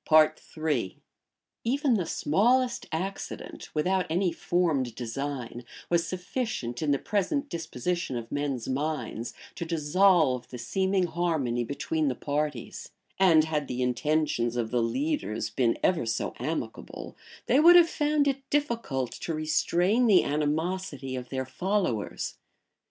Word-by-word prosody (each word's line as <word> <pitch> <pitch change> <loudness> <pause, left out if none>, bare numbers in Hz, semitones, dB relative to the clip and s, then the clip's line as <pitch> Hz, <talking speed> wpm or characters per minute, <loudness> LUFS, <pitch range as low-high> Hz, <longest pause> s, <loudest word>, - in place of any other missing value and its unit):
} 115 -9 -9
Even 270 +3 +2
the 185 -7 0
smallest 240 - +2
accident, 190 +5 -5
without 185 +4 +1
any 175 +2 +1
formed 160 -9 0
design, 125 0 -4 0.3
was 170 -1 +2
sufficient, 180 - -3
in 155 - 0
the 140 - +3
present 275 - -1
disposition 165 -2 -3
of 115 -1 -7
men's 140 -4 -2
minds, 135 -4 -3 0.2
to - - -5
dissolve 160 -4 +3
the 125 - -7
seeming 190 +9 +1
harmony 160 -9 0
between 150 +4 -1
the 130 - 0
parties; 145 -3 -3 0.3
and 170 -5 +6
had 150 -3 -1
the 125 0 -2
intentions 125 -2 0
of 115 -2 -2
the 120 -1 +2
leaders 115 -3 -1
been 120 -3 +1
ever 165 -11 +2
so 115 - -1
amicable 120 - -5 0.3
they 260 - +4
would 340 +3 +8
have 345 -1 +8
found 295 -2 +1
it 270 -1 -2
difficult 230 - -1
to 165 - -4
restrain 175 +9 +2
the 200 -4 +6
animosity 150 -1 -1
of 125 -1 -6
their 130 -1 -2
followers. 175 - -2
155 Hz, 130 wpm, -28 LUFS, 130-190 Hz, 0.3 s, would